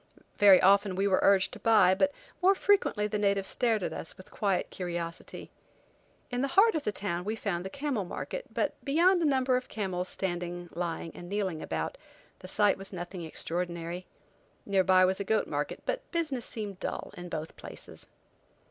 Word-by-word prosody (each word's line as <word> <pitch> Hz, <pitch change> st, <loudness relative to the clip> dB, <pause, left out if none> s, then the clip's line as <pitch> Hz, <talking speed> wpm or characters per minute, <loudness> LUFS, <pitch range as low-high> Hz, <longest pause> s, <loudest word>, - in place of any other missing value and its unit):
Very 200 Hz, -2 st, +8 dB
often 195 Hz, 0 st, +4 dB
we 195 Hz, +2 st, +1 dB
were 190 Hz, -, +3 dB
urged 195 Hz, -1 st, +4 dB
to -, -, -7 dB
buy, 215 Hz, -5 st, +5 dB
but 285 Hz, +9 st, +2 dB, 0.3 s
more 385 Hz, +2 st, +5 dB
frequently 385 Hz, -, +2 dB
the 210 Hz, 0 st, -1 dB
natives 200 Hz, -1 st, +1 dB
stared 225 Hz, -5 st, +1 dB
at -, -, -2 dB
us -, -, -6 dB
with 185 Hz, -, -14 dB
quiet 195 Hz, -4 st, 0 dB
curiosity. 170 Hz, -2 st, -5 dB, 0.8 s
In 245 Hz, 0 st, -1 dB
the 275 Hz, -, +1 dB
heart 450 Hz, +3 st, +7 dB
of 315 Hz, -, -1 dB
the 245 Hz, -, -1 dB
town 180 Hz, -3 st, -2 dB
we 215 Hz, +3 st, -2 dB
found 195 Hz, -6 st, -2 dB
the 190 Hz, -, -5 dB
camel 275 Hz, -4 st, -2 dB
market, -, -, -6 dB
but -, -, 0 dB
beyond 345 Hz, +6 st, +4 dB
a -, -, +2 dB
number 260 Hz, -3 st, +3 dB
of 255 Hz, 0 st, -5 dB
camels 185 Hz, -4 st, -3 dB
standing, 175 Hz, -1 st, -3 dB
lying, 170 Hz, -1 st, -3 dB
and 175 Hz, -, -10 dB
kneeling 190 Hz, -6 st, -2 dB
about, 80 Hz, -1 st, -3 dB, 0.4 s
the 185 Hz, -, -10 dB
sight 205 Hz, +1 st, +2 dB
was 195 Hz, -, -6 dB
nothing 175 Hz, -1 st, -6 dB
extraordinary. 170 Hz, +2 st, -3 dB, 0.6 s
Near 195 Hz, -2 st, +3 dB
by 185 Hz, 0 st, +5 dB
was 190 Hz, +1 st, 0 dB
a -, -, -1 dB
goat 220 Hz, +2 st, +1 dB
market, -, -, -3 dB
but -, -, -3 dB
business 305 Hz, -8 st, -1 dB
seemed 205 Hz, -4 st, -5 dB
dull -, -, -4 dB
in 175 Hz, 0 st, -8 dB
both 160 Hz, -1 st, -5 dB
places. -, -, -10 dB
195 Hz, 185 wpm, -29 LUFS, 180-230 Hz, 0.8 s, Very